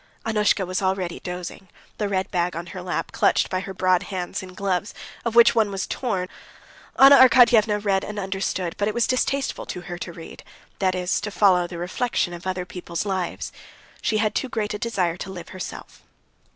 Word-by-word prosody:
Annushka 210 -3 +2
was 185 +2 -2
already 190 -2 -1
dozing, 180 +1 -7 0.3
the 210 -2 0
red 190 -1 -1
bag 175 -1 0
on 170 +1 -4
her 185 - -6
lap, 180 0 -3
clutched - - +2
by 185 - 0
her 195 +1 -6
broad 185 -1 +3
hands, 180 -3 -4
in 185 -1 -11
gloves, 195 +1 -2 0.3
of 235 -1 -2
which 235 0 +7
one 220 -3 +2
was 195 -1 -3
torn. 190 -8 -2 0.7
Anna 275 +1 +9
Arkadyevna 240 -5 +6
read 195 -1 +2
and 210 - -6
understood, 190 -2 -2
but 205 - +1
it 215 - -2
was 235 - +3
distasteful 270 +2 -1
to 180 - -5
her 175 0 -7
to 175 - -5
read, 165 -1 -11 0.4
that 185 -1 +1
is, 180 0 0
to 210 - -3
follow 185 -4 +3
the 175 -1 -8
reflection 180 +1 -1
of 175 +2 -8
other 185 -1 -2
people's 175 0 -5
lives. 190 -3 -3 0.5
She 215 - +1
had 215 0 +1
too 265 - -2
great 210 -3 -2
a 210 - -4
desire 185 -7 -1
to 190 - -6
live 180 -2 -8
herself. 185 -2 -8
190 Hz, 195 wpm, -24 LUFS, 180-210 Hz, 0.7 s, Anna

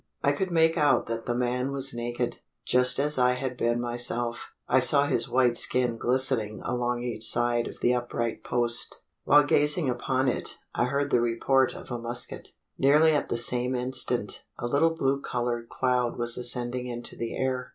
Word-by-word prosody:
I - - +3
could 190 -2 -2
make 165 -1 +2
out 145 -4 +3
that 115 0 -5
the 120 - -1
man 125 +2 -1
was 135 -1 0
naked 120 +1 -3 0.3
just 125 0 +3
as 145 0 0
I 125 0 +3
had 125 0 -4
been 120 0 0
myself: 120 0 -1 0.2
I 130 - +3
saw 140 +3 +5
his 120 - -1
white 125 -2 +2
skin 125 -2 +1
glistening 115 -5 0
along 120 0 -2
each 120 -3 -2
side 120 0 +1
of - - -11
the 125 - +2
upright 120 -1 -3
post. 120 -1 0 0.2
While 145 +1 +6
gazing 150 0 +3
upon 130 +2 -1
it, 125 - 0 0.2
I - - 0
heard 140 +2 -2
the 120 - +3
report 125 +3 +1
of - - -11
a 120 - -3
musket. 120 +1 -3 0.3
Nearly 150 +4 +4
at 145 - -1
the 120 - -1
same 125 +1 +1
instant, 125 -4 -1
a - - -5
little 155 +6 +1
blue 135 -2 0
coloured 120 -2 -3
cloud 125 -2 -1
was 120 -1 +1
ascending 125 0 -1
into 120 0 -7
the 115 -1 -5
air. 130 -1 -2
125 Hz, 185 wpm, -26 LUFS, 120-135 Hz, 0.3 s, While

